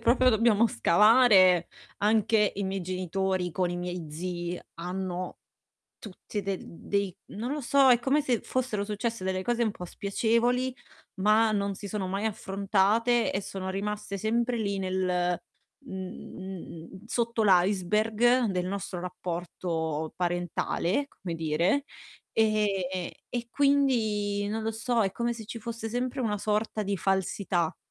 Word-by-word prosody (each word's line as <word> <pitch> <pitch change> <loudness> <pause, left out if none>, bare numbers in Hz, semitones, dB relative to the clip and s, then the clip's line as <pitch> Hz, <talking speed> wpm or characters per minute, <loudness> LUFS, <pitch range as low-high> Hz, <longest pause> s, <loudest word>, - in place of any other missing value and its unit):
proprio 250 +2 +4
lo 220 - +4
dobbiamo 230 0 +4
scavare, 190 - +5 0.3
anche 210 0 +3
i 200 - -1
miei 190 0 -2
genitori 185 0 -1
con 180 +2 0
i 175 - -3
miei 175 -1 -4
zii 175 +2 -4
hanno 180 +1 -4 0.6
tutti 205 0 -6
de 195 -1 -2
d - - -12 0.2
dei 200 -2 0
non 235 +7 -3
lo 300 - -3
so, 275 +1 +5
è 245 - +7
come 270 +5 +2
se 250 -5 0
fossero 250 -6 -1
successe 215 0 -3
delle 185 0 -1
cose 240 +4 +1
un 220 - +1
po' 180 - -8
spiacevoli, 235 +7 0 0.5
ma 215 +2 +4
non 200 -1 0
si 200 - -7
sono 200 -2 -3
mai 195 +3 -2
affrontate 205 +3 +1
e 195 - -1
sono 190 -1 -5
rimaste 205 +1 -3
sempre 235 +4 0
lì 200 -3 -1
nel 180 -2 0 0.4
mhmm, 190 -1 -8
sotto 235 -1 0
l'iceberg 210 +6 +3
del 180 -4 -1
nostro 190 -2 -4
rapporto 170 -3 -3
parentale, 175 - -1
come 185 -10 -7
dire. 165 - +1 0.5
Ehm, 200 -5 +1 0.2
e 240 -1 -3
quindi 225 -8 +2
non 220 +1 -2
lo 220 +1 -1
so, 230 +1 0
è 195 -2 +1
come 235 +4 -1
se 225 -2 -9
ci 230 - -6
fosse 230 0 -5
sempre 250 +3 -2
una 210 -4 0
sorta 215 +1 -1
di 200 0 -1
falsità 190 -2 0
200 Hz, 145 wpm, -28 LUFS, 185-230 Hz, 0.6 s, è